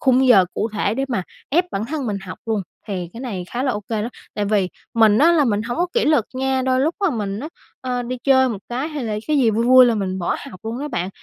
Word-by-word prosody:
khung 260 0 +4
giờ 200 -7 +7
cụ 220 - -1
thể 210 0 0
để 270 +3 -1
mà 215 -8 -1 0.3
ép 345 +6 +3
bản 205 -4 -2
thân 285 0 -3
mình 210 -3 -1
học 185 -1 -8
luôn, 215 -3 0 0.3
thì 180 -4 -3
cái 230 - -9
này 210 -9 -4
khá 245 +2 -2
là 260 -3 +1
ô 205 - -3
kê 220 -2 -1
đó. 225 - -2 0.3
Tại 205 - -1
vì 200 -2 +1 0.3
mình 220 -2 +5
á 330 +5 +6
là 315 -4 +4
mình 215 -4 +1
hổng 240 +1 -4
có 350 - +2
kỷ 475 - +2
luật 295 -8 +3
nha, 265 0 0
đôi 260 0 +2
lúc 315 +5 +1
á 385 - +3
mình 205 -3 -3
á, 300 - -5 0.3
ơ, 250 -1 -2
đi 250 +1 -4
chơi 260 -1 +5
một 220 - -3
cái, 255 +5 -2
hay 300 -5 -4
là 215 -2 -2
cái 305 -1 +2
gì 240 -4 +4
vui 225 +2 0
vui 255 0 +8
là 235 - +2
mình 190 -3 -2
bỏ 175 - -1
học 185 - -12
luôn 225 +2 -4
á 295 +2 -4
bạn. 180 -9 -2
240 Hz, 290 wpm, -21 LUFS, 210-265 Hz, 0.3 s, vui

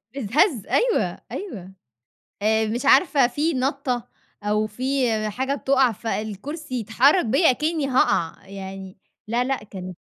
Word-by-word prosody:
أتهز 270 - +1
أيوه، 485 -1 +1
أيوه. 195 - -7 0.7
آآ 220 +1 +2
مش 240 +5 -3
عارفة 280 -3 +5
في 300 +6 -1
نَطّة 260 -2 -1 0.4
أو 210 +1 +1
في 255 +3 -1 0.2
حاجة 265 +6 -2
بتُقَع 265 -2 +2
فالكُرسي 225 - -5
يتحرّك 250 - +3
بيّا 275 +9 +4
أكنِّي 305 +2 -1
هاقَع. 195 -10 +1
يعني 190 -1 -8 0.3
لا، 235 +3 +1
لأ 260 -3 -2
كانت 185 -3 -8
245 Hz, 125 wpm, -23 LUFS, 210-280 Hz, 0.7 s, عارفة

